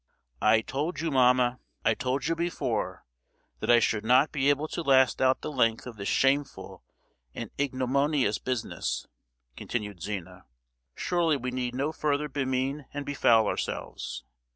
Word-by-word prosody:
"I 110 Hz, +1 st, +5 dB
told 145 Hz, +7 st, -3 dB
you, 165 Hz, 0 st, -1 dB
mamma—I 125 Hz, -1 st, +2 dB
told 130 Hz, 0 st, -2 dB
you 165 Hz, +1 st, +1 dB
before, 145 Hz, -10 st, -2 dB, 0.5 s
that -, -, -4 dB
I 120 Hz, -, +8 dB
should 105 Hz, -2 st, 0 dB
not 130 Hz, +6 st, +4 dB
be 140 Hz, -1 st, +1 dB
able 145 Hz, +2 st, +1 dB
to -, -, -3 dB
last 130 Hz, -5 st, +4 dB
out 130 Hz, 0 st, +3 dB
the 155 Hz, -, -4 dB
length 115 Hz, -5 st, +1 dB
of 125 Hz, -2 st, -8 dB
this 100 Hz, 0 st, -5 dB
shameful 140 Hz, +1 st, 0 dB, 0.5 s
and -, -, -6 dB
ignominious 135 Hz, -2 st, +1 dB
business!" 125 Hz, -3 st, -3 dB, 0.5 s
continued 105 Hz, -6 st, -5 dB
Zina. 100 Hz, -2 st, -6 dB, 0.5 s
"Surely 170 Hz, -4 st, +1 dB
we 125 Hz, -1 st, -4 dB
need 125 Hz, -1 st, -3 dB
no 140 Hz, +4 st, -1 dB
further 150 Hz, -1 st, -1 dB
bemean 135 Hz, 0 st, -2 dB
and 145 Hz, 0 st, -4 dB
befoul 120 Hz, -6 st, +4 dB
ourselves! -, -, -4 dB
130 Hz, 145 wpm, -28 LUFS, 120-145 Hz, 0.5 s, I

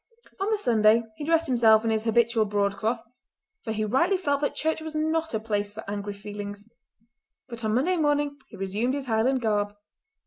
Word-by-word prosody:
On 390 Hz, +2 st, 0 dB
the 435 Hz, -, +2 dB
Sunday 225 Hz, -, +4 dB
he 295 Hz, -, -7 dB
dressed 330 Hz, +1 st, +3 dB
himself 230 Hz, -4 st, +5 dB
in 225 Hz, -, +2 dB
his 220 Hz, 0 st, -1 dB
habitual 230 Hz, -1 st, +3 dB
broadcloth, 205 Hz, +3 st, -1 dB, 0.6 s
for 225 Hz, -, -3 dB
he 215 Hz, 0 st, -1 dB
rightly 275 Hz, -, +2 dB
felt 285 Hz, -6 st, 0 dB
that 290 Hz, -, -1 dB
church 320 Hz, 0 st, -1 dB
was 315 Hz, 0 st, -7 dB
not 315 Hz, -2 st, 0 dB
a -, -, 0 dB
place 205 Hz, -2 st, -2 dB
for 215 Hz, 0 st, -9 dB
angry 205 Hz, 0 st, -4 dB
feelings; 205 Hz, 0 st, -8 dB, 0.8 s
but 235 Hz, -2 st, -8 dB
on 215 Hz, 0 st, +1 dB
Monday 350 Hz, +9 st, +2 dB
morning 290 Hz, -2 st, +1 dB
he -, -, -13 dB
resumed 205 Hz, +7 st, -1 dB
his 280 Hz, -2 st, -4 dB
Highland 250 Hz, +3 st, +1 dB
garb. 205 Hz, -2 st, 0 dB
230 Hz, 185 wpm, -26 LUFS, 210-290 Hz, 0.8 s, himself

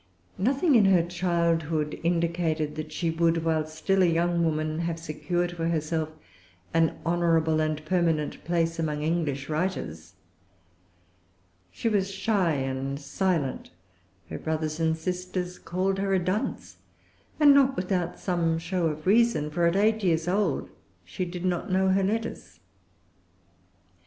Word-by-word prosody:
Nothing 275 Hz, -, +2 dB
in 225 Hz, -5 st, +6 dB
her 185 Hz, -3 st, +5 dB
childhood 170 Hz, -3 st, 0 dB
indicated 165 Hz, -2 st, 0 dB
that 155 Hz, 0 st, -6 dB
she 165 Hz, +1 st, -1 dB
would, 165 Hz, 0 st, +1 dB
while 160 Hz, -1 st, +1 dB
still 175 Hz, +5 st, 0 dB
a 180 Hz, -, +5 dB
young 170 Hz, +1 st, +1 dB
woman, 155 Hz, -1 st, -1 dB
have 170 Hz, -1 st, -2 dB
secured 175 Hz, +2 st, -2 dB
for 165 Hz, -1 st, -3 dB
herself 160 Hz, -1 st, -1 dB, 0.6 s
an 165 Hz, -1 st, +2 dB
honorable 165 Hz, -2 st, +2 dB
and 155 Hz, -1 st, -1 dB
permanent 165 Hz, -3 st, 0 dB
place 165 Hz, -1 st, 0 dB
among 150 Hz, -2 st, -1 dB
English 150 Hz, -4 st, -1 dB
writers. 150 Hz, -, -3 dB, 1.6 s
She 105 Hz, -, -3 dB
was 200 Hz, -3 st, +1 dB
shy 195 Hz, -4 st, +1 dB
and 135 Hz, 0 st, -3 dB
silent. 155 Hz, -1 st, -1 dB, 0.6 s
Her -, -, -4 dB
brothers 155 Hz, 0 st, -2 dB
and 160 Hz, 0 st, +1 dB
sisters 180 Hz, +1 st, -4 dB
called 190 Hz, +2 st, -1 dB
her 195 Hz, 0 st, +1 dB
a -, -, +3 dB
dunce, 185 Hz, +5 st, -3 dB, 0.6 s
and 290 Hz, -2 st, +8 dB
not 275 Hz, -1 st, +4 dB
without 180 Hz, -2 st, -1 dB
some 170 Hz, -3 st, 0 dB
show 170 Hz, +1 st, -1 dB
of 155 Hz, 0 st, -4 dB
reason; 200 Hz, -7 st, +3 dB
for 170 Hz, +2 st, +2 dB
at 170 Hz, -, +1 dB
eight 215 Hz, +2 st, +2 dB
years 165 Hz, -2 st, +1 dB
old 200 Hz, +3 st, 0 dB, 0.3 s
she 185 Hz, -, -4 dB
did 180 Hz, +1 st, -6 dB
not 185 Hz, +2 st, -1 dB
know 190 Hz, +1 st, +3 dB
her 190 Hz, +1 st, +3 dB
letters. 195 Hz, -, -3 dB
170 Hz, 140 wpm, -27 LUFS, 155-185 Hz, 1.6 s, and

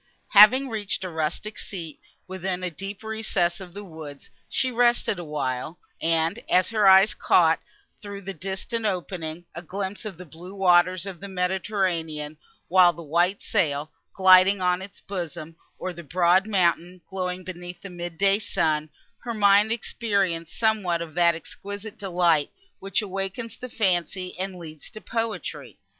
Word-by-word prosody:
Having 235 Hz, +7 st, +7 dB
reached 210 Hz, -4 st, -3 dB
a 185 Hz, -, -3 dB
rustic 160 Hz, +7 st, -3 dB
seat, 165 Hz, -6 st, -7 dB, 0.3 s
within 185 Hz, 0 st, -3 dB
a 180 Hz, -, -2 dB
deep 195 Hz, +5 st, -6 dB
recess 215 Hz, -5 st, -1 dB
of 180 Hz, -1 st, -10 dB
the 205 Hz, -, -7 dB
woods, 160 Hz, -6 st, -10 dB, 0.2 s
she 260 Hz, -1 st, +1 dB
rested 240 Hz, -5 st, +2 dB
awhile, 150 Hz, -1 st, -3 dB, 0.2 s
and, 165 Hz, 0 st, +1 dB
as 185 Hz, 0 st, +4 dB
her 215 Hz, -3 st, +3 dB
eyes 190 Hz, +2 st, +7 dB
caught, -, -, +3 dB, 0.4 s
through 200 Hz, -1 st, -8 dB
a 195 Hz, -, -4 dB
distant 195 Hz, +7 st, -4 dB
opening, 175 Hz, -3 st, -4 dB
a 170 Hz, -, -6 dB
glimpse 190 Hz, +4 st, -4 dB
of 205 Hz, -6 st, -6 dB
the 180 Hz, -, -10 dB
blue 175 Hz, +5 st, -11 dB
waters 185 Hz, -1 st, +3 dB
of 190 Hz, -4 st, -7 dB
the 200 Hz, -, -7 dB
Mediterranean, 180 Hz, -5 st, -2 dB, 0.3 s
with 180 Hz, -1 st, +5 dB
the 170 Hz, -, -9 dB
white 175 Hz, +6 st, +1 dB
sail, 155 Hz, -6 st, 0 dB, 0.2 s
gliding 190 Hz, +1 st, +6 dB
on 180 Hz, 0 st, +1 dB
its 190 Hz, 0 st, -9 dB
bosom, 165 Hz, -4 st, -6 dB, 0.2 s
or 185 Hz, -, -4 dB
of -, -, -13 dB
the 170 Hz, -, -8 dB
broad 180 Hz, +4 st, +3 dB
mountain, 180 Hz, -2 st, +1 dB
glowing 185 Hz, -1 st, -3 dB
beneath 175 Hz, -1 st, -8 dB
the 200 Hz, -, -8 dB
mid 175 Hz, -1 st, -6 dB
day 195 Hz, +2 st, +4 dB
sun, 155 Hz, -7 st, 0 dB, 0.3 s
her 235 Hz, -2 st, -5 dB
mind 205 Hz, +1 st, +5 dB
experienced 195 Hz, -8 st, -1 dB
somewhat 200 Hz, -7 st, +1 dB
of 160 Hz, -2 st, -11 dB
that 170 Hz, 0 st, +4 dB
exquisite 205 Hz, +6 st, -8 dB
delight, 175 Hz, -6 st, +2 dB, 0.3 s
which 195 Hz, +2 st, -1 dB
awakens 195 Hz, +4 st, -4 dB
the 250 Hz, -, -8 dB
fancy, 185 Hz, -3 st, -1 dB
and 190 Hz, 0 st, -3 dB
leads 155 Hz, -3 st, -10 dB
to 215 Hz, -, -10 dB
poetry. 225 Hz, 0 st, -4 dB
185 Hz, 155 wpm, -25 LUFS, 170-200 Hz, 0.4 s, Having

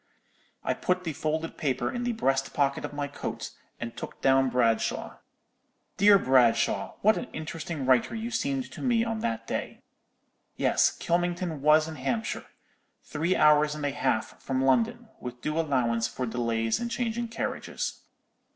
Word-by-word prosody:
"I -, -, +1 dB
put 180 Hz, 0 st, -1 dB
the 165 Hz, -3 st, -3 dB
folded 155 Hz, +2 st, -3 dB
paper 135 Hz, -5 st, 0 dB
in 245 Hz, -1 st, -3 dB
the 245 Hz, -, +1 dB
breast 135 Hz, -11 st, 0 dB
pocket 140 Hz, -1 st, +1 dB
of -, -, -4 dB
my 145 Hz, 0 st, -3 dB
coat, 145 Hz, -, -5 dB, 0.3 s
and 115 Hz, 0 st, -5 dB
took -, -, -8 dB
down 135 Hz, 0 st, +4 dB
Bradshaw. 115 Hz, -3 st, 0 dB, 0.8 s
Dear 200 Hz, +1 st, +7 dB
Bradshaw, 125 Hz, -7 st, +3 dB
what 215 Hz, +2 st, +5 dB
an 250 Hz, -, -4 dB
interesting 160 Hz, -2 st, -5 dB
writer 130 Hz, -, +3 dB
you 225 Hz, +2 st, -4 dB
seemed 270 Hz, +2 st, -1 dB
to -, -, -9 dB
me 240 Hz, -3 st, +2 dB
on 225 Hz, -1 st, -2 dB
that 115 Hz, -, -2 dB
day! -, -, -4 dB, 0.7 s
Yes, -, -, +3 dB
Kylmington 175 Hz, -2 st, -1 dB
was 155 Hz, +2 st, +5 dB
in 160 Hz, -1 st, -7 dB
Hampshire; 220 Hz, -, -2 dB, 0.6 s
three 160 Hz, +5 st, -1 dB
hours 150 Hz, 0 st, +5 dB
and 150 Hz, -1 st, -4 dB
a 145 Hz, -, +1 dB
half 110 Hz, -5 st, -1 dB
from 130 Hz, -1 st, -1 dB
London, 230 Hz, -, +2 dB
with 125 Hz, 0 st, -7 dB
due 150 Hz, +5 st, -2 dB
allowance 120 Hz, -7 st, +1 dB
for 125 Hz, +2 st, -4 dB
delays 115 Hz, -1 st, 0 dB
in 235 Hz, -, -3 dB
changing 235 Hz, 0 st, -2 dB
carriages. 230 Hz, -, -4 dB
150 Hz, 160 wpm, -28 LUFS, 130-205 Hz, 0.8 s, Dear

